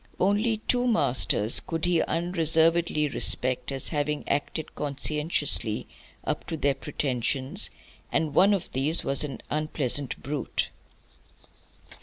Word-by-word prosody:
Only 210 +4 +1
two 245 0 +1
masters 125 - +3
could 165 0 -4
he 175 -2 +1
unreservedly 165 -2 +1
respect 130 -1 +2
as 135 -1 +2
having 150 -1 -3
acted 145 +2 -3
conscientiously 145 -5 0 0.4
up - - -4
to 160 - -4
their 140 -1 +1
pretensions, 135 -1 0 0.4
and 155 -3 -1
one 200 +2 +4
of 190 - -6
these 145 +6 +1
was 140 +2 -1
an 140 -3 -7
unpleasant 145 -3 0
brute. 145 +1 -3
150 Hz, 115 wpm, -25 LUFS, 135-165 Hz, 0.4 s, one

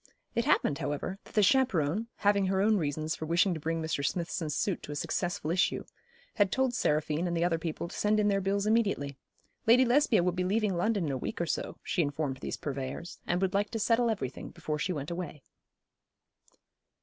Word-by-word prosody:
It 235 - 0
happened, 150 - +2
however, 165 +7 -3
that - - -16
the 210 - +5
chaperon, 210 - +2
having 200 -2 +2
her 190 0 +1
own 215 +2 +4
reasons 155 -1 -1
for 160 - -6
wishing 175 +3 +3
to 160 - -4
bring 165 +1 -2
Mr. 155 -3 -1
Smithson's 165 -1 -2
suit 195 +4 0
to - - -8
a - - -4
successful 165 +1 -2
issue, 180 +2 +1 0.5
had 200 -2 +2
told 260 +1 +1
Seraphine 155 -4 +1
and 170 -1 -1
the 165 - +1
other 170 -2 +1
people 165 +1 -4
to - - -9
send 210 +1 +2
in 210 - +3
their 195 -1 +2
bills 200 +1 0
immediately. 200 -11 +1 0.5
Lady 250 +3 +7
Lesbia 240 -6 +4
would 180 -1 +1
be 180 - 0
leaving 205 +1 +1
London 200 +1 +1
in 145 - -1
a 130 - -2
week - - -4
or 170 - +1
so, - - -3
she 180 - 0
informed 145 -2 -1
these - - -4
purveyors, 140 +4 -5
and 175 +2 +1
would 190 0 +1
like 205 +1 +1
to 225 - -3
settle 230 +2 +3
everything 140 - -3
before 150 -1 -4
she 185 - -1
went 145 -2 -4
away. 170 -5 -5
180 Hz, 210 wpm, -30 LUFS, 155-205 Hz, 0.5 s, Lady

